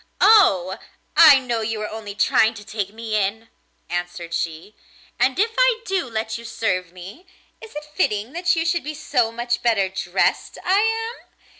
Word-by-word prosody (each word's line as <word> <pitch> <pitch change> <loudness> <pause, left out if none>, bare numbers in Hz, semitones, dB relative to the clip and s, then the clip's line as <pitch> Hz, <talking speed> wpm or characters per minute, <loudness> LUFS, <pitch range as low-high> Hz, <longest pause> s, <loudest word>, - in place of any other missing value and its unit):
'Oh! 190 - +4 0.4
I 310 -4 +9
know 240 -3 -2
you 220 0 -3
are - - -3
only 215 -2 -8
trying 220 +1 +3
to 210 -1 -11
take 200 -2 -4
me 220 0 -5
in,' 215 +2 -1 0.4
answered 175 -1 -5
she; 165 +5 -4 0.5
'and 260 0 +2
if 445 +3 +2
I - - +3
do 375 -8 -2
let 220 0 -3
you - - -11
serve 185 -6 -2
me, 190 - -12 0.3
is 445 -6 -13
it 300 0 -6
fitting 215 - -1
that 350 +1 +1
you 325 0 -1
should 340 0 0
be 305 +1 -6
so 245 -6 0
much 240 +1 -2
better 210 -5 +1
dressed 190 -1 -1
I 380 +2 +3
am? 450 +2 -2
225 Hz, 175 wpm, -21 LUFS, 200-330 Hz, 0.5 s, I